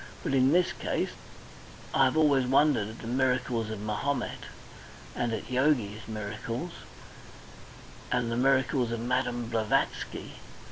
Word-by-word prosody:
But - - -1
in 130 0 +4
this 180 +2 +3
case...I 135 - -3
have 130 +4 +1
always 140 -5 +4
wondered 135 -5 +3
at 110 - -10
the 115 - -7
miracles 125 -2 0
of 110 -2 -5
Mahomet, 120 +5 -2 0.7
and 120 -1 -1
at 110 +2 -4
Yogi's 125 -6 +1
miracles, 110 +8 -4 1.4
and 125 -2 +1
the - - 0
miracles 130 -1 +2
of 115 - -2
Madame 120 0 -1
Blavatsky. 110 -2 -1
125 Hz, 125 wpm, -29 LUFS, 115-135 Hz, 1.4 s, in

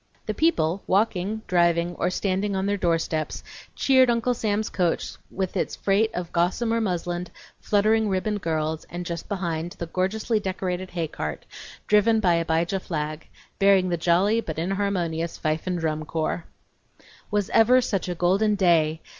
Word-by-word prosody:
The - - -2
people, 195 - +1
walking, 210 +1 0
driving, 170 -1 +2
or 175 - -1
standing 195 +2 -1
on 190 0 -1
their 205 0 +1
doorsteps, 165 -4 -1 0.3
cheered 260 -2 +4
Uncle 235 +1 +2
Sam's 215 -2 -1
coach 175 -3 -1 0.2
with 190 -1 -3
its - - -1
freight 205 +3 +2
of 175 -2 -4
gossamer 225 +7 +1
muslined, 175 -3 -2 0.3
fluttering 215 +1 +2
ribboned 205 +2 -1
girls, 160 -1 -1
and 175 0 -5
just 170 -1 -5
behind, 175 -4 -3
the 170 - -5
gorgeously 205 +6 -1
decorated 185 -2 -3
haycart, 155 - -4 0.4
driven 215 +2 +4
by 180 -5 +3
Abijah 170 +3 0
Flagg, 155 -3 -4 0.3
bearing 195 -2 +4
the 175 - +1
jolly 180 +7 +2
but 160 -7 -6
inharmonious 170 -2 -1
fife 155 +3 -2
and 180 -1 0
drum 155 -2 -2
corps. 160 +1 -2 0.8
Was 205 -2 -1
ever 245 +3 +6
such 200 -7 -1
a 175 - -2
golden 195 +5 +2
day! 165 -5 +2
185 Hz, 150 wpm, -25 LUFS, 170-205 Hz, 0.8 s, ever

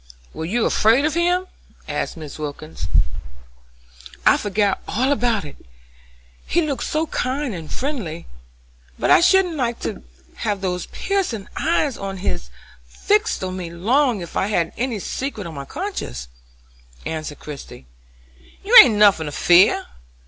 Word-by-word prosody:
"Were 160 - -5
you 220 +7 0
afraid 230 +7 +3
of 310 - +1
him?" 355 +2 +1 0.4
asked - - -3
Mrs. 155 -2 -9
Wilkins. 150 - -6 1.4
"I - - +7
forgot 205 -1 0
all 255 +6 0
about 235 - +1
it: 145 - -12 0.8
he 340 +1 +2
looked 280 -5 -2
so 310 +1 0
kind 265 -3 -2
and 165 -4 -8
friendly. 225 - -4 0.7
But - - +1
I - - +7
shouldn't 360 -2 +4
like 235 -3 -1
to 65 - -4 0.4
have 205 -3 -2
those 180 -2 -2
piercing 370 - -2
eyes 305 -5 0
of 195 -1 -5
his 90 - -3 0.3
fixed 415 - 0
on 185 0 -3
me 175 -2 -5
long 230 +6 +1
if 170 - -9
I 190 - +1
had 170 -6 0
any 245 -2 -2
secret 220 +1 -4
on 165 - -7
my 140 -2 -7
conscience," 275 - -5 0.8
answered 155 -2 -4
Christie. 140 - -10 0.8
"You 430 +5 +2
ain't 235 -5 +4
nothin' 200 -7 +4
to - - -4
fear. 175 +5 +4
210 Hz, 145 wpm, -21 LUFS, -, 1.4 s, I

